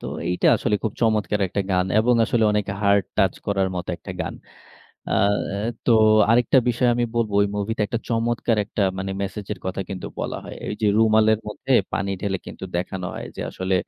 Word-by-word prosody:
তো - - -7 0.2
এইটা 90 - +1
আসলে 110 -3 0
খুব 110 - -1
চমৎকার 105 -3 +1
একটা 100 - -2
গান 90 0 +2
এবং 120 +3 +3
আসলে 115 0 +1
অনেক 105 -1 0 0.2
হার্ট 100 -1 +4
টাচ 95 -2 +3
করার 95 -2 +1
মতো 90 - -5
একটা 95 - -8
গান। 85 +1 -3 0.8
আ - - -3 0.4
এ - - -2 0.3
তো - - +4 0.4
আরেকটা 120 +3 +4
বিষয় 120 +1 +1
আমি 120 - +1
বলবো, 110 -3 0
ওই 100 - +2
মুভিতে 110 +2 -2
একটা 115 -2 -2
চমৎকার 115 -1 0
একটা 105 0 -3 0.2
মানে 95 +1 -3
একটা 95 - -5
মেসেজের 105 +1 -5
কথা 95 +1 -3
কিন্তু 95 -2 -5
বলা - - -3
হয়। - - -8
এইযে 105 +1 -3
রুমালের 110 -1 +4
মধ্যে 130 +5 -5 0.2
পানি 100 0 -1
ঢেলে 95 -2 -1
কিন্তু - - -7
দেখানো 90 +1 -3
হয় - - -6
যে - - -6
আসলে 95 0 -2
105 Hz, 195 wpm, -23 LUFS, 95-115 Hz, 0.8 s, হার্ট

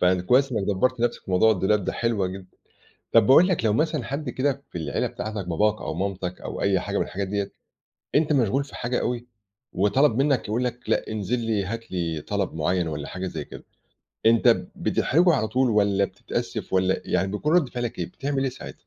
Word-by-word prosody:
فكويس 95 +10 +3
إنك 110 -4 0
دبَّرت 110 +6 0
نفْسك 120 - 0
في - - -9
موضوع 95 +5 +5
الدولاب 100 -1 +2
ده، - - -1
حلوة 115 -5 0
جدًا. 95 0 -7 0.7
طب 115 -2 +5
باقول 165 +7 +7
لك 180 -11 0
لو 105 - +3
مثلًا 155 +1 0
حد 140 +2 -4
كده 140 +2 -1
في - - -5
العيلة 80 -2 -1
بتاعتك 105 -4 -5
باباك 105 +5 +1
أو - - -3
مامتك 90 0 -3
أو - - -6
أي 100 -1 +2
حاجة 100 +2 -3
من - - +2
الحاجات 95 +1 -4
ديّة، 100 0 -2 0.6
أنت 150 +1 +3
مشغول 135 0 +2
في 140 - -15
حاجة 125 +1 -1
أوي، 120 0 -2 0.5
وطلب 110 +7 +3
منك 140 -6 +1
يقول 115 +4 0
لك 125 0 -5
لأ - - +1
انزل 110 +2 -1
لي، 110 -4 -1
هات 115 +2 -6
لي 85 -4 -2
طلب 100 -2 -1
معيّن 85 +2 0
والّا 75 -2 -5
حاجة 90 +1 -5
زي - - -5
كده، - - -11 0.6
أنت 115 0 +5 0.3
بتحرجه 175 +4 +2
على 110 - +1
طول 125 +3 +2
والّا 100 -2 +3
بتتأسف - - -5
والّا 95 0 +2
يعني 95 +2 0
بيكون 150 +10 -1
رد 160 -8 +3
فعلك 120 -4 -4
إيه؟ 85 - -1
بتعمل 135 -1 -2
إيه 135 - +1
ساعتها؟ 125 - -9
110 Hz, 205 wpm, -25 LUFS, 95-125 Hz, 0.7 s, باقول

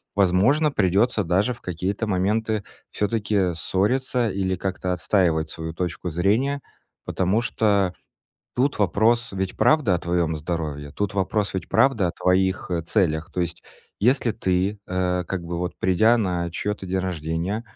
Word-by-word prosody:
возможно, 100 - +3
придётся 105 +1 +2
даже 95 +8 +1
в 120 - -16
какие-то 95 +5 -2
моменты 105 +2 0 0.3
всё-таки 100 -3 0
ссориться 120 +8 0
или 95 -1 -1
как-то 95 0 -3
отстаивать 85 -4 +1
свою 80 +1 -5
точку 90 +1 -3
зрения. 110 - +1 0.4
Потому 95 +5 +1
что 100 -5 +1 0.6
тут 135 +3 +1
вопрос 110 +4 +2
ведь 95 -1 -3
правда 150 -11 +3
о - - +1
твоём 85 -1 0
здоровье. 75 -3 -4
Тут 100 -1 -2
вопрос 100 +1 0
ведь 95 -4 -3
правда 130 -8 +3
о - - -4
твоих, 95 +1 +1
э, 85 -2 -1
целях. 85 -2 0
То 90 - -2
есть 85 -1 -3 0.4
если 125 +2 +3
ты, 95 +2 0
э, 90 -1 0
как 95 -2 -3
бы, 85 0 -4
вот 90 0 -2
придя 110 +7 +4
на 90 -5 -1
чьё-то 105 +4 -3
день 95 +1 -1
рождения, 90 +3 -2
95 Hz, 150 wpm, -23 LUFS, 90-105 Hz, 0.6 s, придя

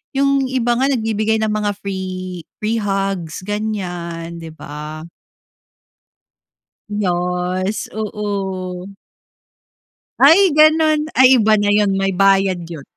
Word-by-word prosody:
'Yong 275 -1 +2
iba 255 -2 0
nga 265 - +2
nagbibigay 220 -4 0
ng 215 - 0
mga 210 -1 -1
free 185 -3 -5 0.2
free 225 +2 0
hugs 195 -5 -3
ganyan 175 -5 -4
'di 165 - -9
ba. 150 +1 -8 1.8
Yes 180 0 -2
oo. 195 -4 -4 1.3
Ay 315 +7 +7 0.2
gano'n. 310 0 +5 0.2
Ay 260 0 +7
iba 215 0 +4
na 205 -1 +1
'yon, 205 -1 +3
may 195 0 0
bayad 195 -1 +3
'yon. 165 -4 -8
200 Hz, 105 wpm, -18 LUFS, 180-220 Hz, 1.8 s, Ay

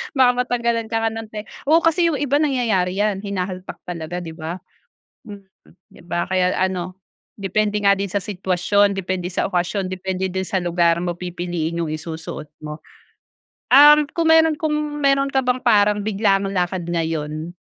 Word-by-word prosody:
Baka 255 -2 +5
matanggalan 235 -2 -1
ka 225 0 -1
nga 225 - +2
ng 225 0 -6
te 215 0 -7 0.2
oo, 325 +3 +5
kasi 335 +1 +3
yung 325 - 0
iba 285 0 +2
nangyayari 230 -11 +1
yan, 205 -2 0
hinahalpak 185 -2 -5
talaga, 175 0 -5
'di 165 -2 -7
ba? 170 +3 -6 0.6
Mm. 205 -3 -11 0.5
'Di - - -16
ba? 175 0 -2
Kaya 185 -1 +1
ano, 185 -1 -2 0.4
depende 205 +2 0
nga 200 - +7
din 200 0 -3
sa 200 - -1
sitwasyon, 195 +1 +1
depende 185 -1 -3
sa 185 - -1
okasyon, 185 +1 -1
depende 185 0 -3
din 190 0 -3
sa 190 - -1
lugar, 170 -1 +2
mo 175 0 -2
pipiliin 175 -2 -4
yung 160 -2 -2
isusuot 160 -1 -7 0.2
mo. 150 +1 -7 0.9
Um, 295 +2 +8
kung 330 -1 +2
meron 320 -1 +5
kung 310 0 -1 0.3
meron 275 0 +3
ka 265 -1 0
bang 250 0 0
parang 210 -4 +3
biglaang 200 -1 +1
lakad 180 -2 -2
ngayon, 160 -1 -3
195 Hz, 165 wpm, -21 LUFS, 175-230 Hz, 0.9 s, Um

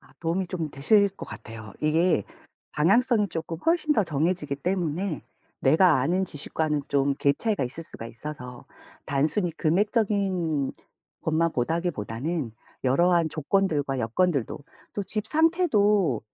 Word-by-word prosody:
아 - - -22
도움이 175 +3 -1
좀 170 -4 -4
되실 200 +10 +4
것 195 - -10
같아요. 110 -2 -9
이게 155 - +2 0.5
방향성이 210 +7 +3
조금 165 -1 -5
훨씬 325 -2 +3
더 220 - +3
정해지기 155 -2 0
때문에 175 +1 -2 0.4
내가 155 +2 +5
아는 180 +8 +1
지식과는 150 -2 -1
좀 140 0 +1
갭 140 +1 +1
차이가 215 - +1
있을 130 +7 -5
수가 115 - -8
있어서 125 +1 -8 0.4
단순히 155 +7 0
금액적인 185 - 0 0.5
것만 165 +1 +1
보다기보다는 145 - -2 0.3
여러한 170 +5 +3
조건들과 150 -4 0
여건들도, 135 +3 0 0.3
또 205 - -3
집 215 +2 +1
상태도 210 - +2
165 Hz, 295 characters per minute, -26 LUFS, 140-195 Hz, 0.5 s, 내가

